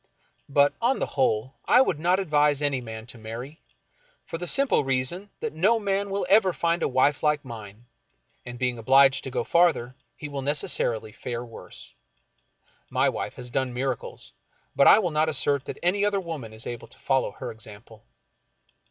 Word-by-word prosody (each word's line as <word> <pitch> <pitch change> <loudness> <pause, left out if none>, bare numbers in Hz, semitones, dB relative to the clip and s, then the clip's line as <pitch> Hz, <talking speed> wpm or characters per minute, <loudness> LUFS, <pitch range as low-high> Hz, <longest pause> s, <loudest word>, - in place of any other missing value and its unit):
But, 140 0 +4
on 260 +3 +2
the - - -1
whole, 130 -1 0
I 245 - +5
would 180 - +2
not 180 +4 +2
advise 150 -5 +2
any 140 -3 +1
man 110 -2 -8
to 120 -1 -8
marry, 120 +8 -8 0.6
for 165 - -6
the 175 - -3
simple 275 - +3
reason 135 +9 -1
that 230 - -3
no 205 +9 +2
man 200 -1 -1
will 195 -1 -2
ever 195 -1 +4
find 170 0 0
a - - +2
wife 130 +2 +2
like 150 -2 +1
mine, 110 -2 -10 0.6
and 120 -1 -8
being 125 -1 -1
obliged 135 +3 +5
to - - -4
go 125 -2 -2
farther, 155 -6 +2 0.2
he 150 - -7
will 140 -2 -5
necessarily 125 -6 -1
fare 120 +2 -5
worse. 115 - -11 1.0
My - - +2
wife - - -5
has 125 - -8
done 130 -1 -1
miracles, 130 -1 -4 0.4
but 140 - +5
I - - +9
will 185 -6 0
not 155 +1 +1
assert 140 -1 +1
that - - -6
any 195 +4 +2
other 205 -1 +1
woman 160 - -6
is 110 +1 -7
able 120 -1 -6
to - - -16
follow 135 0 0
her 125 -2 -7
example. 110 -1 -11
140 Hz, 180 wpm, -25 LUFS, 120-170 Hz, 1.0 s, I